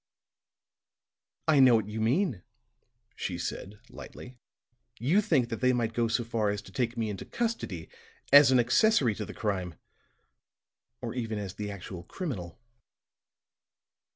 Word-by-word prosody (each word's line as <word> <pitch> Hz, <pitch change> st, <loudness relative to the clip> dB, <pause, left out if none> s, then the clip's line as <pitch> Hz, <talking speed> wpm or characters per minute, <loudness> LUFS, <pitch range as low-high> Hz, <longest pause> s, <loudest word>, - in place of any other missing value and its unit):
"I 155 Hz, -3 st, +5 dB
know 130 Hz, -3 st, +7 dB
what 110 Hz, -3 st, 0 dB
you 110 Hz, +1 st, -4 dB
mean," 125 Hz, -, +1 dB, 0.7 s
she -, -, -4 dB
said, 100 Hz, +2 st, -5 dB
lightly. 125 Hz, 0 st, -11 dB, 0.6 s
"You 160 Hz, -, +3 dB
think 135 Hz, -, +1 dB
that 115 Hz, -, -5 dB
they 130 Hz, 0 st, +4 dB
might 115 Hz, -2 st, -1 dB
go 120 Hz, 0 st, +1 dB
so 115 Hz, +2 st, 0 dB
far 115 Hz, -2 st, -1 dB
as 100 Hz, 0 st, -3 dB
to 95 Hz, -, -13 dB
take 120 Hz, +1 st, -2 dB
me 115 Hz, -1 st, -1 dB
into 100 Hz, -, -6 dB
custody 225 Hz, -, -3 dB, 0.5 s
as 145 Hz, -2 st, +9 dB
an 130 Hz, -, +5 dB
accessory 125 Hz, -, +3 dB
to 105 Hz, +1 st, -5 dB
the -, -, -10 dB
crime, 95 Hz, -6 st, -2 dB, 1.3 s
or -, -, -4 dB
even 115 Hz, -3 st, -3 dB
as 100 Hz, -2 st, -5 dB
the 105 Hz, 0 st, -5 dB
actual 95 Hz, -2 st, -7 dB
criminal." 100 Hz, -, -6 dB
115 Hz, 145 wpm, -29 LUFS, 105-130 Hz, 1.3 s, as